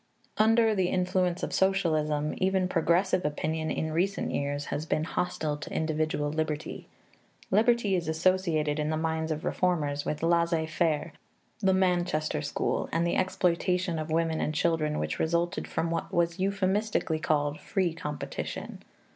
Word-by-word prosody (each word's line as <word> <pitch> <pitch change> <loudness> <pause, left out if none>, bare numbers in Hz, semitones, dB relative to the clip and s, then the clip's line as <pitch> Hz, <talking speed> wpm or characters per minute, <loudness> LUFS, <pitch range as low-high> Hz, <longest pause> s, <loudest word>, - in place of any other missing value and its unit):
Under 225 +1 +5
the 190 -3 +1
influence 180 -1 0
of - - -2
socialism, 155 -6 +1
even 190 0 +1
progressive 180 +2 +2
opinion, 155 +2 -2
in 160 - -2
recent 185 +5 0
years, 145 0 -2
has 155 +2 -3
been 155 - +1
hostile 155 -3 -2
to 150 - -8
individual 155 -2 -1
liberty. 155 -1 -3 0.6
Liberty 220 -1 +3
is 175 -3 -2
associated, 160 -2 +1
in 150 0 0
the 155 - 0
minds 160 0 -1
of 155 +1 -3
reformers, 150 -6 0
with 150 - -3
laissez 170 -1 +2
faire, 160 0 0 0.5
the 190 -3 +3
Manchester 175 -5 +1
School, 145 -1 -1
and 165 +1 +1
the 170 - +1
exploitation 180 -1 +1
of 155 +1 -4
women 160 0 +1
and 155 - -1
children 155 -2 +1
which - - -2
resulted 170 +2 0
from 165 0 -1
what 165 - -2
was 170 +1 +1
euphemistically 195 -3 0
called 145 -1 0
"free 185 -4 0
competition." 150 -3 -5
165 Hz, 145 wpm, -28 LUFS, 155-185 Hz, 0.6 s, Under